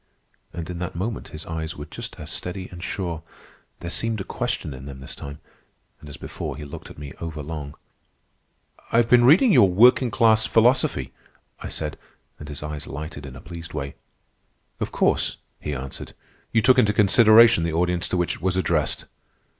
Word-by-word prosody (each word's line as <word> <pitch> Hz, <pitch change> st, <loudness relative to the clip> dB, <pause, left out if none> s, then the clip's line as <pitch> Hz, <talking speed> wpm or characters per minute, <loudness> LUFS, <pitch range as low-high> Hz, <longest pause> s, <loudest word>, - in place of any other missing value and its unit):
And 85 Hz, -1 st, -6 dB
in 90 Hz, -1 st, -5 dB
that 90 Hz, 0 st, -4 dB
moment 105 Hz, +6 st, -3 dB
his 75 Hz, +1 st, -9 dB
eyes 80 Hz, +1 st, -4 dB
were 75 Hz, -, -6 dB
just -, -, -8 dB
as -, -, -6 dB
steady 90 Hz, +1 st, -4 dB
and 90 Hz, -1 st, -10 dB
sure. 85 Hz, -5 st, -3 dB, 0.6 s
There 85 Hz, -, -5 dB
seemed 115 Hz, +1 st, -1 dB
a -, -, -3 dB
question 75 Hz, -, -3 dB
in 65 Hz, +1 st, -9 dB
them 70 Hz, -1 st, -8 dB
this 65 Hz, -, -8 dB
time, 70 Hz, +1 st, -9 dB, 0.6 s
and 75 Hz, -, -12 dB
as 70 Hz, -, -9 dB
before -, -, -6 dB
he 75 Hz, -, -7 dB
looked 70 Hz, -, -9 dB
at -, -, -12 dB
me 70 Hz, -2 st, -8 dB
over 80 Hz, -2 st, -5 dB
long. 75 Hz, -2 st, -6 dB, 1.2 s
"I -, -, +3 dB
have 115 Hz, -1 st, +4 dB
been 120 Hz, 0 st, +6 dB
reading 185 Hz, -, +7 dB
your 105 Hz, -, +7 dB
'Working 120 Hz, +6 st, +5 dB
class 110 Hz, -1 st, +4 dB
Philosophy,'" 120 Hz, +4 st, +2 dB, 0.5 s
I -, -, -6 dB
said, -, -, -5 dB, 0.4 s
and 75 Hz, -, -9 dB
his 75 Hz, 0 st, -6 dB
eyes 75 Hz, -1 st, -5 dB
lighted 75 Hz, 0 st, -7 dB
in 65 Hz, -, -10 dB
a 65 Hz, -, -10 dB
pleased 85 Hz, -1 st, -9 dB
way. 70 Hz, -2 st, -4 dB, 0.9 s
"Of -, -, -3 dB
course," -, -, +1 dB, 0.2 s
he 75 Hz, -, -4 dB
answered, 65 Hz, +1 st, -7 dB, 0.4 s
"you 115 Hz, -1 st, +3 dB
took 130 Hz, +2 st, +6 dB
into 105 Hz, -4 st, +4 dB
consideration 110 Hz, +1 st, +6 dB
the 85 Hz, -1 st, -1 dB
audience 90 Hz, +1 st, +1 dB
to 90 Hz, -, -1 dB
which 90 Hz, -1 st, 0 dB
it -, -, -18 dB
was 95 Hz, 0 st, +1 dB
addressed." 95 Hz, -, 0 dB
85 Hz, 190 wpm, -24 LUFS, 75-110 Hz, 1.2 s, reading